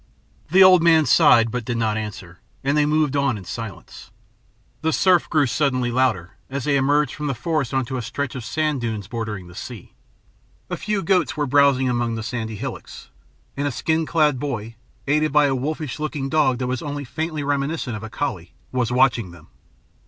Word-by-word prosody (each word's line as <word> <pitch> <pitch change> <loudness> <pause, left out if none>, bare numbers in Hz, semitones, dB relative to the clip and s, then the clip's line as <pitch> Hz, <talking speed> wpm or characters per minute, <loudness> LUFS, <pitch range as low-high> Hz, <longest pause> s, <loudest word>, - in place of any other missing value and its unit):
The 190 +4 +7
old 185 -2 +7
man 165 -2 +5
sighed 115 -3 +5
but 125 0 -3
did 120 +1 -3
not 110 -2 0
answer, 100 -5 -6 0.2
and 140 +2 +1
they 150 -1 +3
moved 150 -2 +1
on 140 -5 +1
in 95 - -10
silence. 115 +1 -8 0.7
The 160 - +1
surf 180 +2 +3
grew 155 -3 +3
suddenly 130 -2 0
louder, 115 -9 0
as 135 0 -4
they 145 +1 +1
emerged 145 0 +2
from 150 0 -4
the 135 - -1
forest 150 0 -1
upon 130 -1 -1
a 125 - -2
stretch 140 +3 -4
of 130 -3 -6
sand 150 +4 -1
dunes 110 -4 -3
bordering 110 -5 -5
the 90 - -13
sea. 110 +2 -9 0.8
A - - 0
few 210 -2 -2
goats 165 -6 +1
were 150 - +1
browsing 140 -1 +3
among 120 -2 0
the 110 - -4
sandy 115 -2 -4
hillocks, - - -8 0.5
and 145 +1 -1
a - - -1
skin 160 +5 -1
clad 150 -5 +2
boy, 115 -6 -4 0.3
aided 150 +2 +1
by 150 0 +4
a 140 - +1
wolfish 150 +2 -3
looking 150 -3 -3
dog 145 -5 +2
that 125 - -2
was 125 0 -2
only 145 -1 -4
faintly 155 +3 -3
reminiscent 140 -2 -2
of 105 - -6
a 110 - -7
collie, 110 - -4 0.2
was 125 -2 -1
watching 125 -5 +2
them. 85 -2 -15
135 Hz, 195 wpm, -22 LUFS, 115-150 Hz, 0.8 s, The